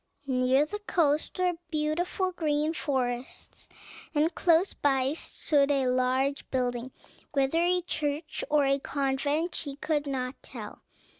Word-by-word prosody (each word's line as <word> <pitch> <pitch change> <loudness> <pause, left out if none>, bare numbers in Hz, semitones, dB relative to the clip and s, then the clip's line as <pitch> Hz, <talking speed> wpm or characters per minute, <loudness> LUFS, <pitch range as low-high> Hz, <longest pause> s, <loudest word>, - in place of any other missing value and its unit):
Near 260 +1 +3
the 415 +7 -5
coast 315 -7 +1
were 365 -1 +2 0.2
beautiful 335 +4 -1
green 305 -2 0
forests, 255 -5 -3 0.5
and 310 +3 +2
close 345 +2 +3
by 270 -1 +1
stood 290 -3 +1
a 275 -2 +2
large 255 +2 +1
building, 250 -1 -1 0.4
whether 275 +4 +2
a 360 +1 +2
church 305 0 -2
or 295 -1 +4
a 275 +1 +2
convent 285 +5 -1
she 280 -3 -3
could 295 0 -1
not 255 -1 -3
tell. - - -9
290 Hz, 130 wpm, -28 LUFS, 265-320 Hz, 0.5 s, or